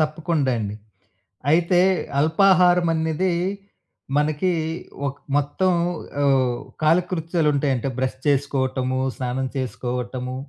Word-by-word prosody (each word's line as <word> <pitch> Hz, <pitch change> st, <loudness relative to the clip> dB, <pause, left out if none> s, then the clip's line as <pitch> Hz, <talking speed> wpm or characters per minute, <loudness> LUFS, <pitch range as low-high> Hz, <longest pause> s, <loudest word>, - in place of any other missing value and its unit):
తప్పకుండా 155 Hz, -2 st, 0 dB
అండి. 105 Hz, -1 st, -4 dB, 0.8 s
అయితే 175 Hz, +2 st, +3 dB, 0.4 s
అల్పాహారమన్నిది 175 Hz, 0 st, +3 dB, 0.9 s
మనకి 155 Hz, +5 st, +1 dB, 0.6 s
ఒక్ 140 Hz, +1 st, -6 dB, 0.2 s
మొత్తం 145 Hz, +6 st, +1 dB, 0.5 s
ఓహ్! 130 Hz, -3 st, +2 dB, 0.2 s
కాలకృత్యాలు 165 Hz, -1 st, +1 dB
ఉంటాయంటే, 135 Hz, -3 st, 0 dB
బ్రష్ 130 Hz, 0 st, -1 dB
చేసుకోవటము, 130 Hz, -2 st, 0 dB, 0.2 s
స్నానం 130 Hz, +1 st, -2 dB
చేసుకోవటము. 125 Hz, +1 st, -4 dB
145 Hz, 80 wpm, -22 LUFS, 130-165 Hz, 0.9 s, అయితే